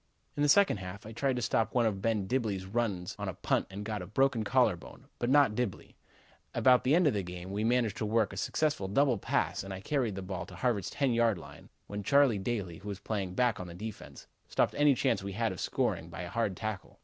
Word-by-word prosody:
"In 145 - -2
the 145 - +3
second 200 - +5
half 95 +2 -8
I 110 - -8
tried 130 +3 0
to 125 - -2
stop 110 +1 0
one 120 -2 +4
of 100 -3 -1
Ben 110 -2 0
Dibblee's 105 -5 -1
runs 100 -4 -2
on - - -2
a - - -6
punt - - 0
and 100 +2 -7
got 105 -2 -3
a 90 - -7
broken 130 +2 +2
collar 120 -3 +3
bone, 115 +9 -13
but 120 - 0
not 140 -5 +5
Dibblee. 115 -4 -3 0.6
About 125 -1 +5
the 135 +4 +4
end 180 0 +4
of 145 - +4
the 100 - 0
game 90 +1 -7
we 105 +2 -1
managed 115 -2 +1
to 110 - -2
work 110 -2 +1
a - - -8
successful 145 -2 0
double 125 +3 +2
pass - - -1
and 95 - -7
I 95 - -5
carried 120 -1 -1
the 95 - -5
ball 90 -2 -5
to - - -11
Harvard's 115 -8 0
ten 135 -4 0
yard 115 -3 +3
line 85 - -12 0.2
when 105 0 -5
Charlie 135 -1 +4
Daly, 95 -5 -3
who 100 - -11
was 100 - -4
playing 100 -3 -3
back 120 -3 +2
on 90 - -6
defense, 110 +1 -8 0.2
stopped - - +1
any 145 -2 +4
chance - - +1
we 100 0 -5
had 115 +1 0
of 90 - -7
scoring 80 - -1
by 85 0 -7
a 90 - -5
hard 110 -3 -1
tackle. 110 -4 -5
110 Hz, 245 wpm, -31 LUFS, 95-125 Hz, 0.6 s, second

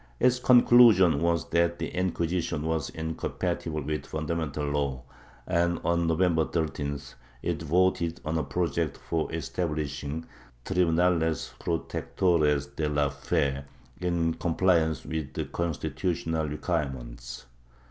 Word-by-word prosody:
Its 125 0 +3
conclusion 120 - +6
was 85 -1 0
that 85 +1 +2
the 80 - -3
Inquisition 85 -3 -1
was 80 -2 -1
incompatible 80 -1 -3
with 75 +2 -2
the - - -17
fundamental 80 -2 -2
law 70 -3 -1 0.4
and, 85 0 +1
on 85 0 +2
November 80 0 +3
13th, 70 -3 -3 0.3
it - - -1
voted 85 +1 +1
on 80 +1 -1
a 80 - +1
project 85 -3 -1
for 80 -1 -2
establishing 75 -2 -3 0.4
"Tribunales 85 -3 +1
protectores 75 -4 0
de 75 -2 -1
la 75 -1 +1
fe" 70 -1 -1 0.4
in 85 -2 0
compliance 85 -2 +1
with 75 -4 -4
the - - -2
constitutional 80 0 -2
requirements. 65 -7 -4
80 Hz, 115 wpm, -28 LUFS, 75-85 Hz, 0.4 s, conclusion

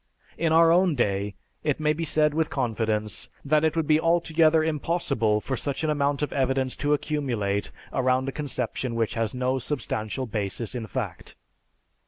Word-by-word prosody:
In 165 -1 0
our 165 +1 +6
own 175 -2 +4
day, 100 -4 0 0.3
it 150 -1 0
may 150 0 +2
be 165 +2 -3
said 150 -1 +3
with 160 0 0
confidence, 110 -4 -2 0.2
that 150 +2 +3
it 160 0 +2
would 165 -2 +1
be 155 0 +4
altogether 165 -1 +3
impossible 145 -8 0
for 130 - -2
such 140 +4 -3
an 155 - +2
amount 145 0 0
of 150 - -2
evidence 135 -1 0
to 145 +1 +2
accumulate 120 -10 -1 0.2
around 130 0 +1
a - - -1
conception 130 -4 -3
which 115 -2 0
has 115 +2 -1
no 130 +1 0
substantial 130 -3 -3
basis 105 0 -3
in 120 -3 -4
fact." - - -5
135 Hz, 170 wpm, -26 LUFS, 115-155 Hz, 0.3 s, our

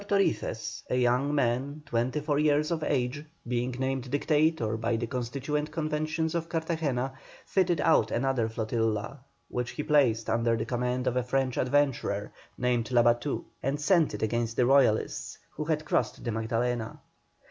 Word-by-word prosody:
Torices, 120 - 0
a - - +1
young 125 +4 +2
man, 140 +3 0
twenty 130 +2 -1
four 145 -1 0
years 150 +1 +2
of 160 -2 -1
age, 135 +1 -1 0.2
being 120 +1 0
named 130 -1 -2
Dictator 145 -4 +1
by 115 +1 0
the 115 +1 -1
Constituent 140 +5 -3
Convention 155 0 -1
of 165 -1 -2
Cartagena, 160 -6 -1 0.3
fitted 180 -4 +1
out 165 - +4
another 125 -2 0
flotilla, 110 +2 -2 0.3
which 125 -1 -3
he 150 - -4
placed 125 -8 +3
under 115 0 +2
the 110 - -2
command 125 +1 -1
of 125 - 0
a - - +3
French 130 0 0
adventurer 130 -7 0 0.3
named 120 -2 0
Labatut, 120 +2 +2 0.2
and 140 +2 -1
sent 165 0 +3
it - - -4
against 115 +1 -1
the 125 - +3
Royalists, 130 -4 +2
who 155 - -5
had 155 -1 -1
crossed - - 0
the 120 - -2
Magdalena. 115 +1 -2
130 Hz, 155 wpm, -28 LUFS, 120-150 Hz, 0.3 s, out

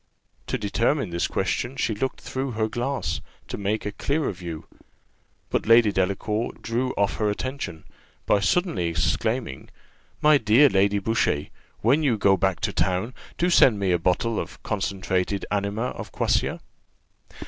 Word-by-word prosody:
To - - -1
determine 115 - 0
this 85 0 0
question, 120 +3 -2
she 120 - 0
looked 130 +6 -3
through 130 -1 -4
her 110 0 0
glass, 125 +4 -2 0.3
to - - -5
take 105 +2 -2
a 105 - -2
clearer 145 +5 -1
view; 85 -4 -7 0.9
but - - -1
Lady 115 -2 +6
Delacour 100 +4 -1
drew 120 +3 -1
off 100 -1 0
her 105 -1 +1
attention, 105 - -4 0.4
by 105 - +3
suddenly 100 - +1
exclaiming 85 -5 -1 0.5
"My 150 -1 +5
dear 120 +6 +5
Lady 100 -1 +2
Boucher, 100 -8 0 0.3
when 135 +8 +3
you 130 -7 +2
go 100 -1 +4
back 95 -1 0
to - - -1
town, 95 +7 0 0.2
do 180 +1 +1
send 125 -9 +6
me 95 -2 +1
a 90 - +2
bottle 100 +6 0
of - - -7
concentrated 95 -1 -1
anima 105 +4 -1
of - - -8
quassia." - - 0
105 Hz, 150 wpm, -25 LUFS, 95-125 Hz, 0.9 s, Lady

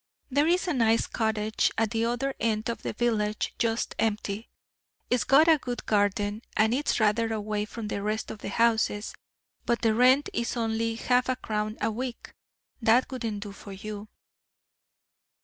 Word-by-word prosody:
There 290 +4 +3
is 360 +2 +2
a 350 - +1
nice 230 -3 +3
cottage 220 -1 0
at 225 -2 +1
the 225 0 0
other 245 +4 -1
end 220 -1 0
of 235 - -3
the - - -3
village 215 -2 0
just 230 -1 0
empty. 215 0 -1 0.6
It's 250 - +3
got 290 +5 +5
a 320 -2 +6
good 245 -2 -5
garden, 205 0 +1 0.2
and 220 +2 +4
is 280 0 0
rather 225 +1 +2
away 210 -1 -2
from 220 0 -6
the 200 - -3
rest 215 +2 -2
of 215 - -8
the - - -5
houses; 220 -1 +1 0.5
but 235 0 0
the 225 -1 +4
rent 255 +5 +5
is 235 +1 -2
only 225 0 0
half 250 +2 +1
a 255 - +2
crown 215 -2 -3
a - - +1
week. 245 +2 -6 0.5
That 230 +4 +3
wouldn't 225 -5 -3
do 205 - -7
for 200 0 -10
you." 210 +2 -7
225 Hz, 170 wpm, -27 LUFS, 215-240 Hz, 0.6 s, a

